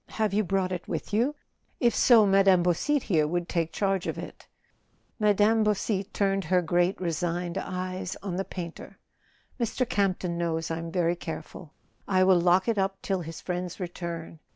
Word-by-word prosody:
Have 215 -3 -1
you 215 +1 +2
brought 190 -1 0
it 180 -1 -4
with - - -4
you? 245 +8 +2 0.4
If 240 -2 +3
so, 230 -4 +6
Mme. 195 -2 +5
Beausite 250 - +1
here 155 -6 +2
would 175 +2 -2
take 165 -2 -1
charge 195 -1 0
of - - -3
it - - -9 0.4
" - - -41
Mme. 210 +1 +4
Beausite 205 -1 -1
turned 195 -2 0
her 180 +3 +3
great 175 +2 +1
resigned 175 0 -2
eyes 185 0 -4
on 190 -3 -3
the 190 - -1
painter. 170 -3 -8 0.6
"Mr. 240 +2 0
Campton 185 -5 0
knows 165 -1 -1
I'm 165 0 -4
very 175 -1 +1
careful. 165 -1 -8 0.3
I 185 -2 +3
will 185 -2 +5
lock 180 +3 +3
it 225 -3 +1
up 195 0 -1
till 190 -2 -1
his 165 -1 -8
friend's 180 0 -4
return. 170 -2 -6
185 Hz, 175 wpm, -27 LUFS, 170-195 Hz, 0.6 s, so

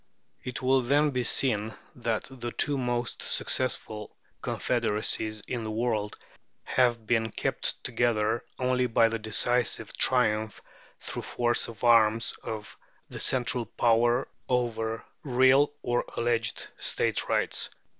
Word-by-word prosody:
It 125 +1 -5
will 130 +1 +4
then 145 +4 +2
be 125 -2 -1
seen 110 -4 +1 0.2
that 115 -3 -2
the 120 -2 -5
two 145 +3 +1
most 120 -2 -2
successful 110 -4 -2 0.2
confederacies 110 -2 -1
in 120 -2 -3
the 110 - -4
world 110 -2 -1 0.5
have 120 -3 +1
been 115 0 +1
kept - - -1
together 115 -2 +1
only 125 0 +1
by 115 0 +4
the 115 0 -3
decisive 115 +1 0
triumph 110 -4 +1 0.4
through - - -5
force 120 -1 0
of 115 0 -11
arms 115 -2 +4
of 110 -1 -6 0.3
the - - -7
central 120 -2 +1
power 120 +3 +2 0.2
over 115 -3 -1 0.2
real 130 +2 +4
or 120 0 +1
alleged 115 -1 -1
State - - 0
rights" - - 0
(p. - - -24
120 Hz, 125 wpm, -28 LUFS, 110-125 Hz, 0.5 s, will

